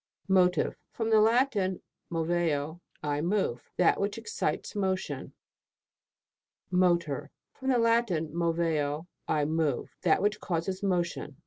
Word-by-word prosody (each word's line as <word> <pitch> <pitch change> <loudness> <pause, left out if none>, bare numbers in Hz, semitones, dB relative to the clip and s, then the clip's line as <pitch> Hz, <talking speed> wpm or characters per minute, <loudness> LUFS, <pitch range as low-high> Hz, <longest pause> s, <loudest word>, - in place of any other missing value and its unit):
MOTIVE. 180 -3 +3
From 225 -1 -2
the 220 - +6
Latin, 220 -5 +2 0.3
moveo, 165 -1 -1 0.2
I 145 -1 0
move. 175 - -1
That 180 - +4
which 200 +1 -1
excites 455 - -2
motion. 190 -2 -2 1.4
MOTOR. 175 -6 +2 0.2
From 265 0 -4
the 255 - +4
Latin, 230 -10 +2
moveo, 165 -3 0 0.2
I 150 -1 +1
move. 155 -4 -1
That - - +3
which 205 +1 +1
causes 185 +1 -2
motion. 175 -7 -1
175 Hz, 115 wpm, -29 LUFS, 160-200 Hz, 1.4 s, the